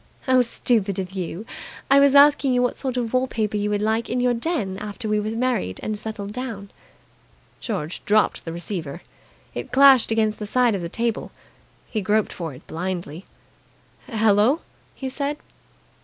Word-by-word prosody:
"How 255 -1 +4
stupid 220 -4 0
of 185 -1 -3
you! 190 +1 -5 0.5
I 275 - +8
was 280 0 +5
asking 280 -2 +6
you 245 - +3
what 245 - 0
sort 260 -2 -3
of 235 -2 -2
wall 255 +1 +2
paper 215 -3 -2
you 205 0 0
would 205 0 0
like 220 +2 0
in 250 - 0
your 245 0 +2
den 230 - -2
after 210 +2 -5
we 210 0 +1
were 210 +1 -2
married 230 - -1
and 215 - -2
settled 205 -1 -5
down." 225 -6 -6 0.9
George 185 -7 -4
dropped 215 0 +2
the 165 - -5
receiver. 170 -2 -5 0.5
It - - -6
clashed 270 -2 +6
against 220 -1 +1
the 210 - -5
side 245 +1 +3
of 195 - -2
the 170 - -4
table. 230 +3 -2 0.6
He 215 - -2
groped 210 +2 +1
for 165 -3 -5
it - - -15
blindly. 175 -1 -5 0.8
"Hello!" 220 +6 +3 0.3
he 265 - -5
said. 280 +2 -2
215 Hz, 170 wpm, -23 LUFS, 200-250 Hz, 0.9 s, I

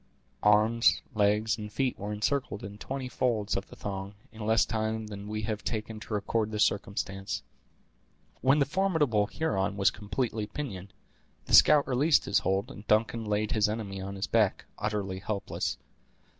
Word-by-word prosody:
Arms, 110 +3 +4
legs, 105 +1 +2
and 105 -1 -6
feet 130 +3 0
were 105 +1 -4
encircled 105 0 -1
in 100 +1 -8
twenty 135 -1 -4
folds 115 -5 0
of 95 - -3
the - - -13
thong, 100 0 -5 0.2
in 110 0 -8
less 110 0 +4
time 110 0 -2
than 100 -1 -8
we 110 0 -3
have 105 0 -3
taken 110 -1 -3
to 110 - -5
record 105 +1 0
the 105 -1 -4
circumstance. 100 -1 -1 1.0
When 135 +3 +4
the 140 - +3
formidable 150 - +1
Huron 100 -10 -1
was 100 0 +4
completely 105 +1 -3
pinioned, 105 -7 -6 0.5
the - - -5
scout 150 -2 +7
released 140 +4 +3
his - - +3
hold, 95 +1 -1
and 105 - -11
Duncan 110 +1 +2
laid 105 0 0
his 105 -1 +2
enemy 100 -3 -4
on 100 +1 -5
his 95 - -2
back, 110 -4 +1
utterly 100 -3 -2
helpless. 100 0 -3
105 Hz, 165 wpm, -29 LUFS, 100-115 Hz, 1.0 s, scout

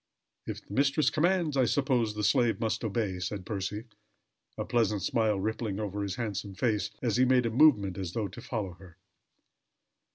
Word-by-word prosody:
"If - - -6
the - - -10
mistress 140 +3 +2
commands, 170 -2 +1
I 130 -2 +4
suppose 120 -5 +1
the 105 - -3
slave 120 0 +3
must 110 +1 -1
obey," 105 -4 -1
said 90 +1 -4
Percy, 105 +2 -3 0.7
a - - -2
pleasant 110 -5 +1
smile 110 -3 +1
rippling 110 0 -2
over 105 -1 -3
his 100 -2 -3
handsome 100 -4 -4
face, 105 -1 0
as 120 -2 +1
he 130 - +5
made 125 -1 +3
a 115 - 0
movement 110 -9 +4
as 90 -2 -4
though 110 -3 -1
to 95 - -10
follow 105 -7 -4
her. 90 -3 -15
110 Hz, 175 wpm, -29 LUFS, 100-125 Hz, 0.7 s, he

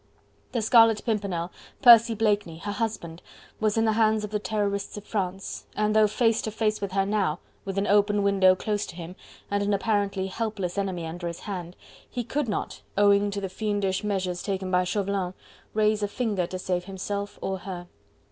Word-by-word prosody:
The 235 -3 0
Scarlet 225 -1 +5
Pimpernel, 195 -6 -1 0.3
Percy 230 -2 +8
Blakeney, 205 -6 +1
her 205 +5 -4
husband, 205 -6 -3 0.4
was 215 0 +1
in 225 - +3
the 220 - +3
hands 215 -1 +2
of 210 - -5
the 210 - 0
Terrorists 205 -1 -2
of 205 - -7
France, 195 -3 -4
and 210 0 +1
though 215 -1 +6
face 225 +1 +2
to - - -3
face 215 -1 -1
with 200 -2 -3
her 195 0 +2
now, 195 -6 0 0.3
with 195 0 -4
an 195 - +1
open 205 0 +3
window 195 -2 +5
close 210 +2 -2
to - - -9
him, 175 +1 -8 0.4
and 200 0 +1
an 200 0 +2
apparently 200 -2 0
helpless 200 -2 -3
enemy 185 -4 -2
under 170 +2 -5
his 170 0 -6
hand, 180 -4 -6 0.3
he 245 - -3
could 280 +1 -2
not 205 - -3 0.2
owing 205 0 +5
to 200 0 -3
the 195 - -3
fiendish 195 -1 -1
measures 185 -4 -1
taken 190 -2 -3
by 180 0 +3
Chauvelin 195 -1 -1 0.4
raise 215 0 +3
a 205 - +1
finger 205 -5 -1
to 185 - -5
save 180 -1 -2
himself 200 +1 -4
and 190 0 -2
her. 180 -2 -7
200 Hz, 190 wpm, -26 LUFS, 185-215 Hz, 0.4 s, Percy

